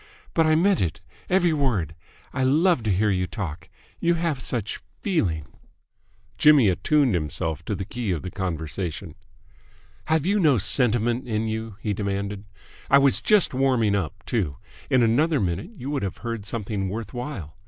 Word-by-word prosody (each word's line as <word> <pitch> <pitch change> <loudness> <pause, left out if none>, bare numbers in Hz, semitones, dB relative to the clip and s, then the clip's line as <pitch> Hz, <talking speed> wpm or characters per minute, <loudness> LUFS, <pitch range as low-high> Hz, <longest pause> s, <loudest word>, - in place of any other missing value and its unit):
"But 165 -1 +3
I 155 - +4
meant 190 +4 +3
it, 85 -4 -1 0.3
every 180 -3 +3
word. 115 - 0 0.4
I 130 - 0
love 155 +3 +3
to 105 - +2
hear 105 +3 +2
you 90 -1 0
talk. 85 -6 -6 0.3
You 170 0 +2
have 165 -5 -1
such 115 -5 -3 0.2
feeling!" 95 - 0 0.9
Jimmy 145 -8 +6
attuned 125 - +2
himself 80 -1 -2
to 105 - -2
the 95 - -4
key 120 +1 -4
of 85 -5 -1
the 90 - -5
conversation. 85 -2 -4 0.9
"Have 160 -1 +1
you 205 +3 +2
no 150 -8 +4
sentiment 120 +3 +1
in 110 -1 -1
you?" 110 -1 -4
he 105 - -1
demanded. 100 0 -3 0.4
"I - - +7
was 140 -1 +3
just 210 -8 +3
warming 125 -5 +2
up, 90 -7 -3
too! 85 - -1 0.3
In 130 -2 +4
another 145 +7 +3
minute 95 - -2
you 135 +1 -5
would 145 - -1
have 95 -3 -3
heard 115 -3 -4
something 100 -3 -3
worth 110 0 -5
while. 120 - -6
115 Hz, 165 wpm, -24 LUFS, 95-140 Hz, 0.9 s, I